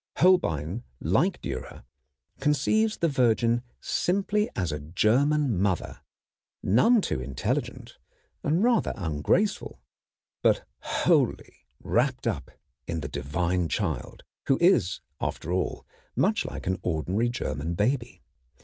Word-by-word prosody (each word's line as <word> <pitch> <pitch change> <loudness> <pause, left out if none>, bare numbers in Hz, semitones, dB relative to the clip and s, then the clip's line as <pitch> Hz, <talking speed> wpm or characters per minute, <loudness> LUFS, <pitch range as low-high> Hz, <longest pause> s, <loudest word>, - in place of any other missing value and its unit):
Holbein, 100 - +3 0.2
like - - +1
Dürer, 65 -2 -6 0.6
conceives 180 +10 +2
the 170 - +2
Virgin 120 -4 +2 0.2
simply 200 +3 0
as 90 -4 -1
a 75 - -3
German 115 - +2
mother, 95 -4 -1 0.6
none 210 - +4
too 65 - -2
intelligent, 65 +1 -3 0.4
and 165 +7 +2
rather 240 -1 +2
ungraceful, 90 - 0 0.6
but - - +3
wholly - - +1 0.3
wrapped 125 +1 +1
up 85 - -2 0.4
in 85 -1 -2
the 70 - -4
Divine 85 +5 -1
Child, - - -3 0.2
who 135 - +4
is 135 - +3 0.2
after 85 - -3
all 90 0 -2 0.3
much - - +2
like - - -6
an 95 0 -1
ordinary 90 +8 0
German 85 - -3
baby. 120 +5 -1
110 Hz, 115 wpm, -27 LUFS, -, 0.6 s, none